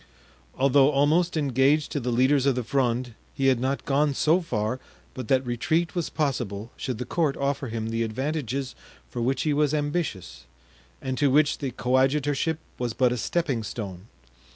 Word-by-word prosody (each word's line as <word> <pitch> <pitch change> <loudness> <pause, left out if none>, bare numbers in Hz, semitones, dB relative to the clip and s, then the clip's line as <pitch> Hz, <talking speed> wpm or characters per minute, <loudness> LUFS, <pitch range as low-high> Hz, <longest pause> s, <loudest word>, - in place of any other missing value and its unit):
Although 135 +1 +5
almost 155 +5 +2
engaged 140 +1 +2
to 145 - -1
the 125 -1 -3
leaders 130 +3 +3
of 135 - +3
the 125 - -1
Fronde 125 -1 0 0.2
he 135 -1 +3
had 130 -3 +2
not 135 +2 -2
gone 145 0 +2
so 165 +7 +3
far 115 -6 -2 0.3
but 130 -3 -6
that 130 +1 +2
retreat 160 +8 0
was 175 -3 -2
possible 120 -8 -2
should 125 -4 -4
the 125 - -4
court 160 -5 0
offer 140 -1 -1
him 110 -1 -3
the 115 0 -1
advantages 130 +2 -2 0.4
for 120 - -4
which 130 +3 0
he 150 - +1
was 150 0 +2
ambitious 125 - -3 0.6
and 130 -1 -2
to 145 -1 +4
which 150 +2 +3
the 140 - -2
coadjutorship 135 +5 +1 0.2
was 120 -2 -2
but 125 0 +2
a - - 0
stepping 140 -2 -1
stone. 100 -3 -6
135 Hz, 175 wpm, -26 LUFS, 120-145 Hz, 0.6 s, Although